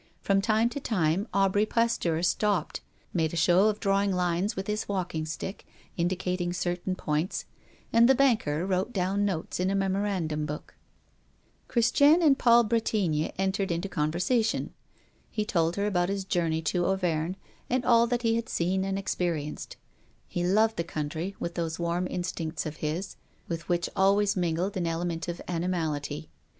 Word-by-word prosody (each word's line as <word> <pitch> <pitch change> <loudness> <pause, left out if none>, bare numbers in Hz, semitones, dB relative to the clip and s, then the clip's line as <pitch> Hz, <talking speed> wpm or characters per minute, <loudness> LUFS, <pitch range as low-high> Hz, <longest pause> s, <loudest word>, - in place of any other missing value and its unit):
From 195 0 +2
time 220 +2 +3
to 285 - -5
time 190 - 0
Aubry 195 +2 +2
Pasteur 215 -8 +1
stopped, 200 +2 0 0.3
made 160 -3 0
a - - -2
show 175 +4 +5
of 215 0 -2
drawing 200 -1 +2
lines 180 +2 0
with 190 - -3
his 210 +1 -3
walking 180 -5 -2
stick, 175 +5 -5 0.3
indicating 180 0 -1
certain 180 +1 -2
points, 155 0 -2 0.5
and 230 +2 +6
the 265 - +6
banker 220 - +2
wrote 190 +5 -1
down 195 +2 0
notes 180 -5 -3
in 185 +1 +1
a 195 - 0
memorandum 190 -6 -1
book. 150 0 -7 0.9
Christiane 285 +7 +4
and 285 -4 +5
Paul 235 0 +6
Bretigny 210 -8 0
entered 195 +1 0
into 170 +3 -1
conversation. 185 +8 0 0.6
He 215 - -2
told 170 -4 +1
her 200 - 0
about 180 -3 +1
his 195 -1 -2
journey 165 -3 0
to 175 +2 0
Auvergne, 180 -2 0 0.3
and 255 0 0
all 235 -1 +5
that 240 0 -1
he 225 -1 +2
had 230 - -4
seen 185 +3 0
and 195 0 -1
experienced. 170 -6 -3 0.5
He 175 - -3
loved 215 +5 +3
the 170 - 0
country, 160 +4 -4
with 170 - -3
those 165 -2 -2
warm 170 +1 -1
instincts 175 -2 -3
of 155 0 -5
his, 160 +6 -3 0.3
with 170 0 -5
which 175 -1 +1
always 200 +1 +3
mingled 180 +2 -1
an 175 -2 -1
element 165 0 -2
of 175 0 -4
animality. 160 -4 -2
185 Hz, 160 wpm, -28 LUFS, 170-205 Hz, 0.9 s, and